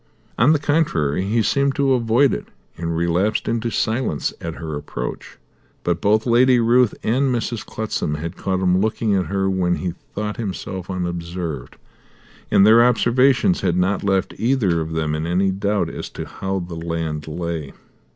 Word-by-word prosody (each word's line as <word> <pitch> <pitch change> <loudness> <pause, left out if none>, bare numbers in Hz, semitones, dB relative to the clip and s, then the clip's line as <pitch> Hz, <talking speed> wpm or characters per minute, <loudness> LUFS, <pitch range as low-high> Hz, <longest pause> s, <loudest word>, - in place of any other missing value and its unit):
On 120 +7 +4
the 155 - +4
contrary 95 - 0
he 110 +3 +1
seemed 140 +4 +1
to 140 -2 +2
avoid 125 +3 +3
it, - - -4 0.3
and 85 0 -3
relapsed 85 +5 0
into 115 0 -1
silence 110 - -1
at 85 -1 -5
her 80 -2 -5
approach. 60 -4 -6 0.5
But 85 -1 -1
both 110 +2 +2
Lady 125 +1 +4
Ruth 120 0 +3
and 130 +4 +1
Mrs. 120 -1 -2
Clutsam 105 -8 -3
had 80 +2 -5
caught 95 -1 -2
him 90 0 +3
looking 110 0 0
at 95 -2 +1
her 95 0 0
when 90 -2 +1
he 90 -2 -3 0.2
thought 105 +2 -3
himself 95 -4 -5
unobserved, 85 -6 -4 0.7
and 100 - +5
their 115 +2 +7
observations 125 - +3
had 90 -2 +1
not 95 +3 +1
left 95 -1 0
either 110 -9 +1
of 80 0 -4
them 80 -1 -1
in 80 +1 -2
any 95 +3 +2
doubt 100 +2 0
as - - -6
to - - -4
how 95 0 -4
the 85 -2 -5
land 80 -2 -4
lay. 80 -2 -4
95 Hz, 170 wpm, -21 LUFS, 85-115 Hz, 0.7 s, their